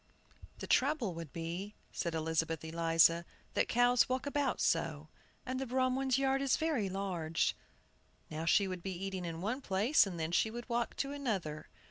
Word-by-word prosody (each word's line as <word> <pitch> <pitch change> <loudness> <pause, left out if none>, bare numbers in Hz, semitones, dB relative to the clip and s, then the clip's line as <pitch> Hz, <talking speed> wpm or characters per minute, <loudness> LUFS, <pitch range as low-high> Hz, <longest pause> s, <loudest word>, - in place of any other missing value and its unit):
"The - - -6
trouble 260 - +2
would 165 -4 -7
be," 175 +5 -5 0.2
said 170 -2 -2
Elizabeth 160 0 -1
Eliza, 165 +1 +4 0.3
"that - - +2
cows 245 +1 +4
walk 255 +2 -1
about 285 -2 0
so, 155 -1 0 0.4
and 255 0 -3
the 270 - -3
Bromwicks' 260 +1 +1
yard 270 0 +2
is 275 -1 +2
very 295 -11 0
large. 180 -4 -1 0.7
Now 155 +1 -4
she 195 +4 +4
would 185 -2 -5
be 190 0 -4
eating 190 -2 -4
in 165 -1 -5
one 230 +8 -2
place, 210 +4 +3
and 175 -3 -5
then 160 +1 -2
she 220 - +2
would 240 +2 -7
walk 235 -1 -1
to 275 - -2
another. 200 - -3
195 Hz, 170 wpm, -34 LUFS, 165-255 Hz, 0.7 s, Eliza